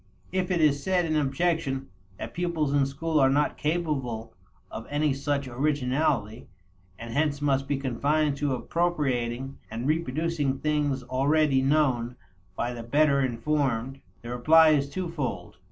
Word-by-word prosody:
If 185 0 -1
it 180 -2 +1
is 145 -2 +3
said 180 +1 +1
in 155 -1 -1
objection, 145 - 0 0.3
that - - -7
pupils 165 -4 -1
in 140 -1 +3
school 155 +3 -1
are 135 -1 +5
not 145 +2 +1
capable 150 -8 -2 0.4
of 115 - -7
any 145 0 +1
such 140 0 -2
originality, 130 -4 -1 0.5
and 115 0 -8
hence 145 0 +1
must 135 -2 0
be 140 - 0
confined 140 +3 0
to 140 -2 0
appropriating 135 -5 -1
and 115 +2 -5
reproducing 155 -2 0
things 145 -3 0
already 135 +2 +2
known 130 -4 +1 0.4
by 120 - -2
the 120 - -6
better 140 +4 +3
informed, 130 0 -1 0.2
the 120 - -6
reply 155 +6 +5
is 140 -2 +2
twofold. 150 - -4
140 Hz, 140 wpm, -27 LUFS, 130-155 Hz, 0.5 s, are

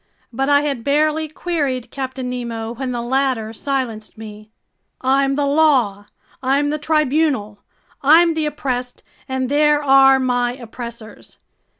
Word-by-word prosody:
But 270 +4 -1
I 285 0 +5
had 280 -5 -3
barely 305 +3 +1
queried 290 -6 -3
Captain 260 -1 -5
Nemo 235 -2 -4
when 255 +1 -4
the 240 -1 -3
latter 250 -3 -1
silenced 230 -4 -4
me: 215 -1 -11 0.5
"I'm 275 +1 +1
the 290 0 0
law, 265 -9 +2 0.3
I'm 280 +3 +1
the 305 - -2
tribunal! 295 -8 0 0.4
I'm 330 +4 +5
the 315 -1 -1
oppressed, 250 -4 -4 0.3
and 260 -1 -1
there 295 +1 +2
are 270 -1 +6
my 245 -1 0
oppressors! 235 -2 -10
265 Hz, 130 wpm, -19 LUFS, 240-290 Hz, 0.5 s, are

